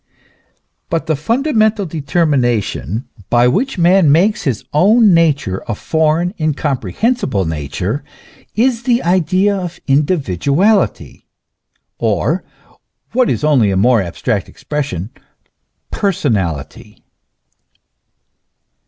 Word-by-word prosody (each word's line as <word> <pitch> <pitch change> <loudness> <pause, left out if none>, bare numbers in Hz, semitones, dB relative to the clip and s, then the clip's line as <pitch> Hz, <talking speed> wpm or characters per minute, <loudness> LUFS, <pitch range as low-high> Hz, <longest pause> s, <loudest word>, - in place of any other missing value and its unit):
But 165 -1 -1
the 160 -1 0
fundamental 220 - +1
determination 135 - -1 0.2
by 120 0 +4
which 225 - 0
man 175 -2 +4
makes 190 +8 +2
his 125 -7 -2
own 205 +6 +5
nature 145 - +1
a 115 - -2
foreign, 160 - 0
incomprehensible 150 - -1
nature, 80 - -3 0.5
is 235 +1 +1
the 240 0 +1
idea 185 +3 +2
of 180 -2 -5
individuality 145 - 0 0.7
or - - 0 0.7
what 255 0 +2
is - - -1
only 135 -9 +3
a 95 - 0
more 115 +2 +3
abstract 85 -3 -3
expression 130 - -5 0.8
per 200 - 0
sonality. 105 - -3
155 Hz, 95 wpm, -16 LUFS, 120-195 Hz, 0.8 s, own